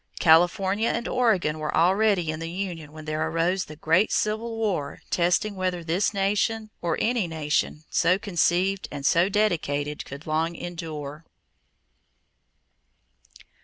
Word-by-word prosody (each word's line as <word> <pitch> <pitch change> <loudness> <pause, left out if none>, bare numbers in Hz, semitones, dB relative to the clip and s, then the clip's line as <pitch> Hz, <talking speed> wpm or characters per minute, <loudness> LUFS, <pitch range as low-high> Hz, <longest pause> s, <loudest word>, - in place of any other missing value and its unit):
California 190 +6 +4
and 235 - -2
Oregon 195 -11 +1
were 155 0 -2
already 185 0 +3
in 155 - -6
the 165 0 -5
union 170 -4 -5
when 155 0 -10
there 155 +1 -1
arose 170 +3 0
the 155 - -10
Great 165 +6 +2
Civil 225 +2 -1
War 190 -11 -2
testing 180 +4 +1
whether 185 -2 -2
this 175 +5 +1
nation 215 +2 0
or 170 -2 -1
any 230 -5 +1
nation 155 -1 -1
so 180 +2 +3
conceived 190 0 0
and 140 -1 -6
so 170 +6 +4
dedicated 150 -8 0
could 140 +3 -10
long 160 +2 -1
endure. 160 -4 -6
175 Hz, 130 wpm, -25 LUFS, 155-200 Hz, -, California